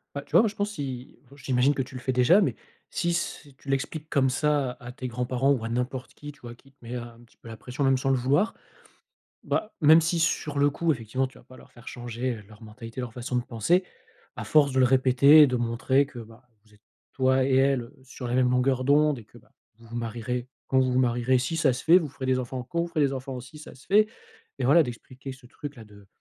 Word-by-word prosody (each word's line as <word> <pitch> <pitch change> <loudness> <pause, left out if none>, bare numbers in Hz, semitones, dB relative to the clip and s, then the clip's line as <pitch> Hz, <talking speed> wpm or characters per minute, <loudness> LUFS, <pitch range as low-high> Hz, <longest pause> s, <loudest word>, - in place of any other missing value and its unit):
Bah, 140 - -3
tu - - -22
vois, - - +7
moi 225 - +2
je 205 - -8
pense 205 0 -2
si, 130 -7 -6 0.2
heu, - - -14
j'imagine 130 +1 +1
que - - -3
tu 130 +1 -11
le 130 - -6
fais 130 0 -1
déjà, 125 +11 +5
mais - - 0 0.4
si 175 - -1
s 170 -3 -3
tu 140 - -17
l'expliques 150 +3 -3
comme 135 -2 +2
ça 145 -1 0
à 120 0 -9
tes 130 0 -6
grands-parents 125 +3 0
ou 125 -5 -2
à 115 - -3
n'importe 125 +2 -3
qui, 145 0 -10
tu 145 - -24
vois, 120 -1 -9
qui 135 +3 -22
te 135 - -34
met 120 +2 -6
un 120 -1 -8
petit 120 - -24
peu - - -13
la 115 - -8
pression, 125 +5 -6
même 135 -1 +4
sans 135 +1 -1
le 135 - +3
vouloir. 140 - +1 0.9
Bah, 215 - -2
même 160 +1 +7
si 165 +1 0
sur 150 -3 0
le 145 +1 +4
coup, 165 +3 0
effectivement, 130 +1 -2
tu 130 - -15
vas - - -20
pas 130 - -15
leur - - -17
faire 120 0 -12
changer 120 -1 -4
leur 110 +1 -17
mentalité, 115 +3 -9
leur 120 -3 -6
façon 125 0 -4
de 125 - +1
penser, 165 - +1 0.5
à - - -5
force 145 -3 +3
de 130 - 0
le - - +6
répéter 130 +3 +6
et - - +8
de 125 -2 -1
montrer 120 +4 +1
que, 135 -3 -12
bah, 115 +3 -13 0.2
vous 105 - -23
êtes, 105 - -26 0.3
toi 130 0 +2
et 135 - +2
elle, 135 -1 +3
heu, 115 - -14
sur 130 -1 -9
la 120 - -2
même 125 -1 +3
longueur 130 +1 +1
d'onde, 145 0 +3
et 110 - -12
que - - -18
bah, - - -26 0.3
vous 115 - -17
vous 115 - -7
marierez, 120 +1 -4 0.2
quand 130 - +2
vous 130 -1 +2
vous 125 - +2
marierez, 125 +1 +2
si 130 +6 -2
ça 150 -5 +3
se 125 - -5
fait, 170 +3 +6
vous 155 -6 -5
ferez 130 0 -6
des 130 0 +2
enfants, 125 0 -4
quand 170 +7 -3
vous - - -2
ferez 160 - -2
des 140 -2 +2
enfants, 130 -1 -6
si 130 +5 -13
ça 150 - -12
se 130 - -18
fait. 215 +2 +4 0.5
Et 130 - -2
voilà, 165 +5 +6
d'expliquer 130 +1 -8
ce 130 -1 -15
truc-là 140 -2 -9
de 100 -1 -17
130 Hz, 265 wpm, -26 LUFS, 120-145 Hz, 0.9 s, et